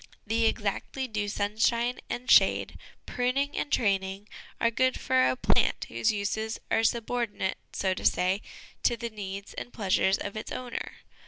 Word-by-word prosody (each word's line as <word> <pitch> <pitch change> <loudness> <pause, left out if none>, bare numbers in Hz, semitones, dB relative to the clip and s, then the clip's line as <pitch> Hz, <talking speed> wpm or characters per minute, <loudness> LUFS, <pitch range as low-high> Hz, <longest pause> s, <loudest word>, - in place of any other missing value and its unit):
The 225 +1 +2
exactly 220 +5 -2
due 210 -3 -2
sunshine 230 +4 +1
and 245 +1 -4
shade, - - +5 0.3
pruning 260 +3 0
and 290 - -2
training, 195 -1 0 0.3
are 230 - +3
good 255 +2 +1
for 130 0 +3
a 130 - +1
plant - - +2
whose 115 - +1
uses 220 +2 -2
are 225 - +3
sub 230 0 +1
ordinate, 230 -6 -1
so 190 -1 0
to - - -7
say, 185 +3 +2 0.4
to 240 - +2
the 235 0 -4
needs 200 -1 -6
and 245 - -7
pleasures 195 -3 +2
of 200 - -5
its 215 - -5
owner. 250 -1 -5
220 Hz, 160 wpm, -28 LUFS, 195-235 Hz, 0.4 s, shade